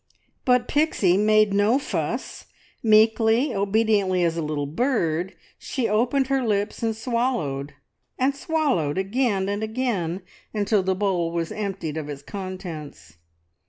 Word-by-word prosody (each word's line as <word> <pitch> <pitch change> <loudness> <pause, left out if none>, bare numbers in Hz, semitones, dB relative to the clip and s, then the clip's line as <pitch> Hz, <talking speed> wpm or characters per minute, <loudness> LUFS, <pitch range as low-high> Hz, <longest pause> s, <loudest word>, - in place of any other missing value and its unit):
But 250 -1 +3
Pixie 290 - +2
made 215 0 +4
no 205 +5 +3
fuss. 280 - -4 0.3
Meekly, 225 +4 +4
obediently 200 -2 +2
as 165 -1 +1
a 170 - -2
little 150 -2 -2
bird, 175 - -1 0.2
she 255 -4 -2
opened 240 +6 +2
her 270 0 +1
lips, 205 -3 -1
and 225 -1 0
swallowed, 215 - -2 0.4
and 270 +2 +1
swallowed 280 - 0
again 195 0 0
and 205 +1 -2
again, 215 -6 -2 0.3
until 205 0 +2
the 190 0 0
bowl 185 -4 0
was 170 -1 -2
emptied 195 -7 -4
of 150 -2 -5
its 140 -1 -7
contents. 160 - -8
205 Hz, 130 wpm, -24 LUFS, 170-235 Hz, 0.4 s, made